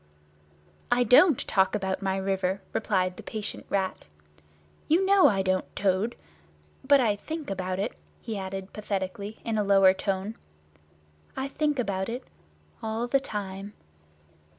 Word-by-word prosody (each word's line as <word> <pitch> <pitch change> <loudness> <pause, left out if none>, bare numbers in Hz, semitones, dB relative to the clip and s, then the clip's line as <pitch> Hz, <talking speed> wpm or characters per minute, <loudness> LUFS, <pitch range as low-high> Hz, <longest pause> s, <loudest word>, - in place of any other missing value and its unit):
"I 245 0 +4
don't 250 - +6
talk 190 +1 +2
about 190 -1 -2
my 190 -1 0
river," 190 0 -1
replied 185 -4 0
the - - -7
patient 215 -2 -5
Rat. 190 -1 -1 0.8
"You 345 +5 +3
know 390 -1 +6
I 195 -3 +2
don't, 185 0 -1
Toad. 200 +4 +1 0.7
But 280 +1 +6
I 220 -5 +2
think 310 +4 -6
about 185 -1 -2
it," 200 +4 -2 0.3
he 225 -2 -5
added 195 0 -5
pathetically, 200 0 -4
in 225 -2 0
a - - +2
lower 195 -1 +6
tone: 195 +2 -3 1.0
"I 265 - -1
think 295 0 0
about 195 -5 -1
it—all 230 -2 -7
the 275 +3 +2
time!" 200 -4 -5
200 Hz, 135 wpm, -27 LUFS, 190-240 Hz, 1.0 s, don't